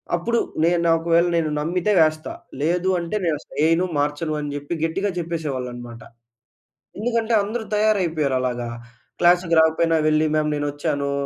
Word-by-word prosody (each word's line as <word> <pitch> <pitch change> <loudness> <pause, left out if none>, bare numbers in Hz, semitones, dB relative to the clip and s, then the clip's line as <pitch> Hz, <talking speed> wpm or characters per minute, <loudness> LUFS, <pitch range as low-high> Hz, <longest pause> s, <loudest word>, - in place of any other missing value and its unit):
అప్పుడు 235 +7 0 0.2
నేను 170 +1 +3
నా 165 - +4
ఒకవేళ 170 +1 +2
నేను 165 -2 +1
నమ్మితే 175 +6 0
వేస్తా. 155 0 +2 0.3
లేదు 175 +4 +1
అంటే 170 +4 -4
నేనసలు 155 -3 -3
ఎయను, 165 +3 +3
మార్చను" 150 +2 -1
అని 145 -1 -4
చెప్పి 145 +3 -5
గట్టిగా 195 +5 0
చెప్పేసేవాళ్ళన్నమాట. 130 -8 -5 1.0
ఎందుకంటే 230 +1 -1
అందరూ 220 +2 -4
తయారైపోయారలాగా. 150 - 0 0.5
క్లాస్‌కి 175 -1 +4
రాకపోయినా 160 +1 +2
వెళ్లి, 155 0 +3
"మ్యామ్! 155 0 +1
నేనొచ్చాను. 145 0 -2
165 Hz, 130 wpm, -22 LUFS, 145-175 Hz, 1.0 s, నా